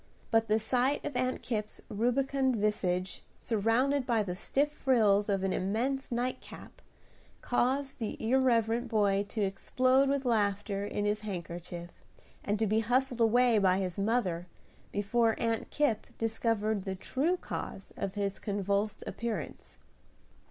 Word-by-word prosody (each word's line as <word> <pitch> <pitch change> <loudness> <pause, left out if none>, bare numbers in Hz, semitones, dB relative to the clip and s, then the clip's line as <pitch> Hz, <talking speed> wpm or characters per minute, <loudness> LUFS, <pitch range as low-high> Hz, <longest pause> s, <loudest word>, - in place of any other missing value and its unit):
But 225 0 +3
the 215 0 +3
sight 250 +5 +1
of 285 - -4
Aunt 255 +1 -1
Kipp's 215 -3 -2
rubicund 260 +4 +1
visage, 190 -4 -1 0.2
surrounded 240 +6 +1
by 230 -3 +2
the 180 -3 -3
stiff 280 +10 0
frills 215 -8 +3
of 195 -1 +1
an 195 - +1
immense 250 +9 -1
nightcap, 245 +2 -5 0.6
caused 265 +3 0
the 220 -3 -3
irreverent 235 -1 +2
boy 200 -2 +2
to 215 - -1
explode 255 +7 +2
with 275 -1 0
laughter 205 -3 0
in 205 - -2
his 210 +1 +1
handkerchief, 175 -3 -6 0.5
and 205 +1 0
to 220 - +1
be 215 +1 +2
hustled 245 +2 +1
away 235 0 +4
by 185 -2 +3
his 190 0 -3
mother 195 -5 0 0.4
before 225 +3 +2
Aunt 230 -1 -1
Kipp 290 -8 0
discovered 220 -2 0
the 190 -1 -3
true 285 - 0
cause 195 - -6
of 195 -2 -4
his 200 -1 -2
convulsed 200 +1 -1
appearance. 235 -1 -5
220 Hz, 140 wpm, -31 LUFS, 200-250 Hz, 0.6 s, away